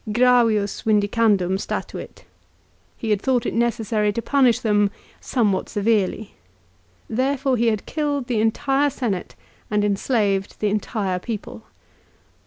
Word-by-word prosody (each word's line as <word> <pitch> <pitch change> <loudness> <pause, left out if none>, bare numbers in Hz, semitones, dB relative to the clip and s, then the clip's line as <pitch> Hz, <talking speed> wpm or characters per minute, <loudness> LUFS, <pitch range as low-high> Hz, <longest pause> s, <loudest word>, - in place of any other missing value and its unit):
" - - -1
Gravius 230 -3 +3
vindi 210 -2 +2
candum 200 -4 +2
statuit." - - -4
1 - - -6 0.5
" - - -38
He 225 - -4
had 205 -2 +1
thought 255 -3 +1
it - - -2
necessary 225 -3 0
to 230 - -2
punish 260 -5 +3
them 205 -2 +2 0.3
somewhat 205 -7 0
severely." 210 0 0 0.7
Therefore 265 +2 0
he 235 0 +1
had 215 -3 0
killed 290 -4 -2
the 235 -3 0
entire 270 +6 +1
Senate, 225 -9 -3 0.3
and 210 -1 +1
enslaved 200 -1 0
the 210 - +1
entire 200 -3 -2
people. 220 +1 -7
220 Hz, 140 wpm, -22 LUFS, 205-245 Hz, 0.7 s, Gravius